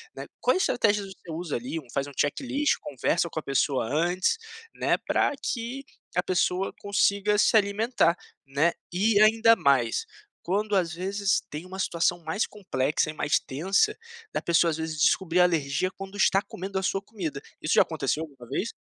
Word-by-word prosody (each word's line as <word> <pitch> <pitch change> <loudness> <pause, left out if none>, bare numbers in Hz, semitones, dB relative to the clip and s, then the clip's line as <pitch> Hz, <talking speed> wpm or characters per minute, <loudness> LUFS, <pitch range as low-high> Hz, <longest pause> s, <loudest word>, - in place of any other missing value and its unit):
né, - - -6
quais 370 - +2
estratégias 205 -4 +1
você 170 - -12
usa 165 -1 -4
ali, 130 +7 -4
um 125 - -21
faz 140 0 -1
um 140 - -10
checklist, 275 - +1
conversa 165 +5 -1
com 155 - -4
a - - -9
pessoa 135 -2 +1
antes, 175 - +1 0.4
né, - - +2
para - - +2
que 245 +3 -3 0.3
a 180 - +2
pessoa 185 +1 0
consiga 200 0 +2
se 220 - +5
alimentar, 200 -3 +2 0.3
né, 150 +5 +2 0.2
e 205 +3 +3
ainda 225 +1 +6
mais, 130 -5 +2 0.4
quando 205 +3 0
às 175 -4 +1
vezes 195 +3 0
tem 150 +4 -6
uma 190 +1 -8
situação 175 0 +1
mais 160 +7 -1
complexa 155 -8 -1
e - - -12
mais 150 -1 +1
tensa, 195 - +1 0.4
da - - -1
pessoa 170 0 +3
às 155 - -3
vezes 160 -1 -4
descobrir 170 +2 +2
alergia 170 0 +2
quando 195 +1 -9
está 195 -1 +4
comendo 195 -1 -5
a - - -5
sua 195 - 0
comida, 175 -9 -5 0.2
isso 155 - +1
já - - +7
aconteceu 155 0 -2
alguma 135 -6 -12
vez? - - -2
180 Hz, 175 wpm, -26 LUFS, 155-200 Hz, 0.4 s, já